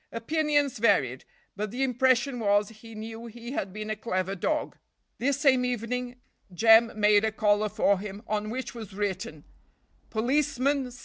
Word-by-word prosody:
Opinions 290 +2 0
varied, 135 - +2 0.3
but 210 +1 -3
the 250 +6 -2
impression 255 0 +2
was 205 -1 +2
he 225 0 -13
knew 225 +2 -7
he 235 +2 -9
had 195 -8 -3
been 215 +2 -5
a - - -1
clever 190 -3 -2
dog. 305 - -2 0.4
This 280 +3 0
same 260 -4 +4
evening, 250 +1 -3 0.4
Jem 225 +3 +5
made 210 0 +5
a 220 - +1
collar 210 0 +2
for 200 -1 +2
him 205 +1 -7
on 215 -1 -2
which 255 +3 -5
was 220 -5 -9
written 190 -7 -3 0.7
"Policeman 265 +2 0
C." 245 +1 -13
225 Hz, 160 wpm, -27 LUFS, 210-250 Hz, 0.7 s, Jem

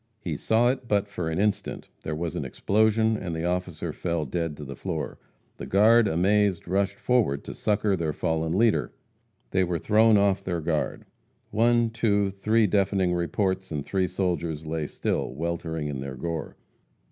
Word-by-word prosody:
He 85 -7 -4
saw 115 +10 +2
it 130 -1 -2
but 105 -2 +1
for 90 -5 -4
an 80 - -2
instant, 105 +1 -1
there 75 - -3
was 80 0 -3
an - - -2
explosion, 110 +2 +2
and 90 -5 -4
the 80 +1 -2
officer 90 +1 -2
fell 85 -3 -2
dead 80 +2 -3
to 75 - -7
the 70 0 -7
floor. - - -4 0.4
The - - -7
guard, 110 +3 +5
amazed, 95 +1 +2
rushed 100 +2 0
forward 115 - +1
to - - -7
succor 105 -1 +1
their 85 -4 -1
fallen 80 +3 -1
leader. 115 0 +2 0.6
They 95 0 +3
were 90 -1 -1
thrown 110 +4 +4
off 100 -1 +2
their 85 -2 -2
guard. 80 -1 -2 0.5
One, 120 +1 +3
two, 100 -3 +1
three 110 +3 +2
deafening 95 -2 +2
reports, 95 +2 -1
and 75 -3 -3
three 95 -2 0
soldiers 85 -4 -2
lay 80 -1 -2
still, 65 - -2
weltering 80 -1 -3
in 70 -3 -4
their 65 0 -5
gore. 85 0 -5
95 Hz, 170 wpm, -26 LUFS, 80-105 Hz, 0.6 s, guard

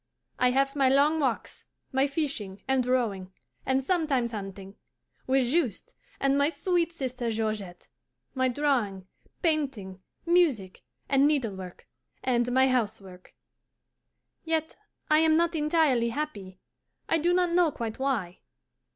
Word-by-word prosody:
I 250 - +4
have 275 +2 +1
my 270 -2 +3
long 290 +4 +3
walks, 260 -6 -2 0.3
my 265 +1 +2
fishing 270 -10 -4
and 265 -1 +2
rowing, 210 -7 0 0.4
and 265 +1 +1
sometimes 275 -8 0
hunting, 195 -2 -7 0.5
with 265 0 +3
Juste 295 - -1 0.3
and 275 +1 +2
my 285 +1 +3
sweet 345 -1 0
sister 255 -6 -4
Georgette, 215 -5 -3 0.5
my 260 -1 +1
drawing, 245 -8 0 0.4
painting, 270 - -1 0.2
music, 305 - +2 0.3
and 275 +1 +4
needlework, 205 -11 -3 0.4
and 245 -1 +1
my 260 +1 +4
housework. 205 -7 -3 1.1
Yet 320 -1 -1 0.4
I 305 - +6
am 320 0 +4
not 340 0 +2
entirely 300 -6 +2
happy, 220 -9 -5 0.5
I 325 - +2
do 345 +3 +2
not 355 -1 +2
know 340 -2 +3
quite 230 -2 -5
why. 230 -10 -2
265 Hz, 125 wpm, -27 LUFS, 215-305 Hz, 1.1 s, I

